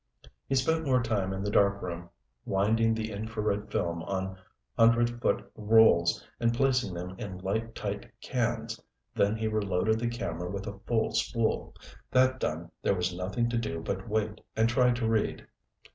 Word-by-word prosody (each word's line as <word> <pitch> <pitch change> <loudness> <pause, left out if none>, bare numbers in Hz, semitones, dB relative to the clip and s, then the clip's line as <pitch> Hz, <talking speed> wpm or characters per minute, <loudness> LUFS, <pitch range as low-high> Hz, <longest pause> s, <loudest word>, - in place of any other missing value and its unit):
He - - 0
spent 160 +5 +2
more 130 -4 +2
time 105 -5 0
in 95 0 -3
the 105 - -1
darkroom 90 -4 +1 0.3
winding 110 +3 +2
the 110 0 -3
infrared 105 -1 -2
film 85 -1 -1
on 95 +1 -3 0.4
hundred 120 +1 +4
foot - - +1
rolls 105 -6 +4
and 115 -1 +3
placing 125 -7 +1
them 90 +1 -5
in 95 -3 -5
light 110 +5 -2
tight 100 0 -4
cans, 120 -3 -2 0.3
then 100 +2 +2
he 110 0 -1
reloaded 110 0 +1
the 120 0 0
camera 90 -8 -4
with 100 +1 -4
a 100 -2 -6
full 115 -2 +1
spool. 115 -2 0 0.3
That 130 0 +3
done, 85 +2 -3
there - - +2
was 90 0 -1
nothing 100 +7 -1
to 120 - +1
do 110 -7 -3
but 95 +5 -4
wait 110 0 -1
and 110 +1 +3
try 125 +1 +4
to 120 -2 0
read. 110 -1 0
110 Hz, 165 wpm, -29 LUFS, 95-115 Hz, 0.4 s, hundred